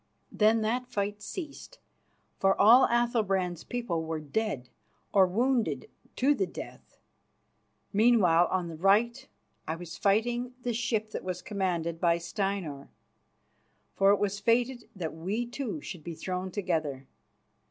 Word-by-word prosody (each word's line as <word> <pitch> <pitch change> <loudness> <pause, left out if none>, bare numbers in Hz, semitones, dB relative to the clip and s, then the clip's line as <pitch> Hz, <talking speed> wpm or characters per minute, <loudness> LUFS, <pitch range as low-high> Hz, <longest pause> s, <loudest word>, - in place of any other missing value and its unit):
Then 220 +1 +3
that 245 +3 -1
fight 205 -3 -3
ceased, 345 - -7 0.6
for 195 0 +3
all 240 +5 +8
Athalbrand's 200 -8 0
people 215 -10 -2
were 160 0 -3
dead 155 - -2 0.5
or 190 -2 +6
wounded 235 +5 0 0.2
to 275 +3 +3
the 380 +6 -1
death. - - -10 1.0
Meanwhile, 195 -6 +5
on 185 -2 -1
the 165 -1 -7
right, 235 +8 +2 0.4
I 160 - -1
was 170 0 -9
fighting 240 +5 +1
the 245 - -1
ship 220 -2 -1
that - - -5
was 180 -1 -4
commanded 175 -5 -2
by 170 -2 +4
Steinar, 175 -5 -3 1.0
for 195 0 +4
it 205 - +5
was 205 0 -1
fated 240 +2 +1
that 165 -5 -4
we 195 +9 -2
two 265 +4 -5
should 175 - -8
be 170 0 -6
thrown 185 +2 -4
together. 160 -9 -2
200 Hz, 135 wpm, -29 LUFS, 175-235 Hz, 1.0 s, all